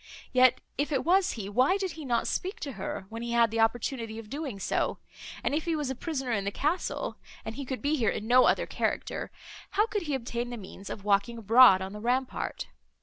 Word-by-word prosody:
Yet, 255 -1 +5 0.2
if 290 +2 0
it 270 -3 0
was 370 +2 +3
he, 210 -4 -5
why 255 - +3
did 380 -2 -2
he 315 -2 -8
not 235 -3 +1
speak 375 +3 -2
to 285 - -3
her, 195 -3 -5
when 230 +1 -6
he 235 0 -3
had 235 -2 +4
the 225 - -1
opportunity 225 0 0
of 225 -2 -9
doing 280 -8 -4
so—and, 195 - -3
if 310 +2 0
he 335 -1 0
was 295 -4 -2
a - - -3
prisoner 270 -3 -3
in 205 -4 0
the 200 - 0
castle, 335 - -2 0.3
and 220 - -4
he 275 +3 -6
could 260 +1 -5
be 300 +2 +2
here 230 -5 +2
in 210 - -3
no 250 +2 +6
other - - +3
character, - - -2 0.5
how 420 - +5
could 415 -2 -2
he 300 -5 -2
obtain 240 -1 -3
the 240 - -5
means 195 -1 -10
of 200 - -7
walking 205 +3 +2
abroad 225 -3 +7
on 190 +1 -6
the 210 - -7
rampart? 250 +3 -1
245 Hz, 225 wpm, -29 LUFS, 225-290 Hz, 0.5 s, abroad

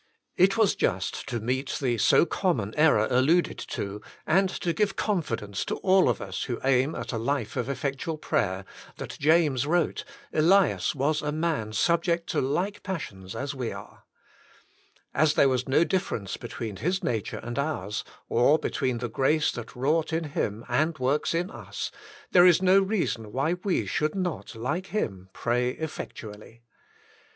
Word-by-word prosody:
It 190 +3 +4
was 220 -3 +4
just 95 +7 -2
to 120 -2 -2
meet 130 +5 -2
the 120 -4 0
so 160 - +5
common 135 - -1
error 150 -9 +4
'alluded 145 +8 +3
to, 100 +1 -5 0.2
and 190 +3 +3
to 175 -2 -2
give 200 +1 0
confidence 115 - -2
to - - -2
all 190 -1 +4
of - - 0
us - - -4
who 120 -3 -3
aim 135 +3 +2
at - - -5
a 115 - -1
life 120 -2 -2
of 125 0 -2
effectual 140 +4 -3
prayer, 95 -10 -1 0.3
that - - -6
James 145 -4 +3
wrote: 170 0 +1 0.3
"Elias 180 +2 +3
was 150 +3 +1
a 150 - -2
man 155 -9 -1
subject 170 - +1
to - - +1
like 180 +10 -1
passions 100 - -6
as 140 0 -3
we 125 -4 -3
are," - - -11 1.1
As 155 +1 +3
there 140 - +5
was 130 0 -1
no 140 +5 +5
difference 170 - -2
between 115 -3 -6
his 185 +4 -1
nature 110 -4 -2
and 120 +2 -5
ours, 110 -9 -2 0.2
or 130 +6 +4
between 130 -5 -1
the 120 +1 -3
grace 135 +6 +2
that 120 -2 -8
wrought 155 +6 +1
in 165 +1 0
him 115 -7 -3
and 155 +1 +1
works 135 +5 0
in 175 +4 -1
us, - - -6 0.4
there 180 0 +7
is 175 -3 +6
no 190 +1 +5
reason 190 - -1
why 140 +8 0
we 195 -4 +1
should 155 +1 -1
not, 180 -9 -3
like 145 +12 -2
him, 95 - -3
pray 125 +4 0
effectu 150 -8 -6
ally. 110 +3 -15
145 Hz, 165 wpm, -27 LUFS, 120-170 Hz, 1.1 s, there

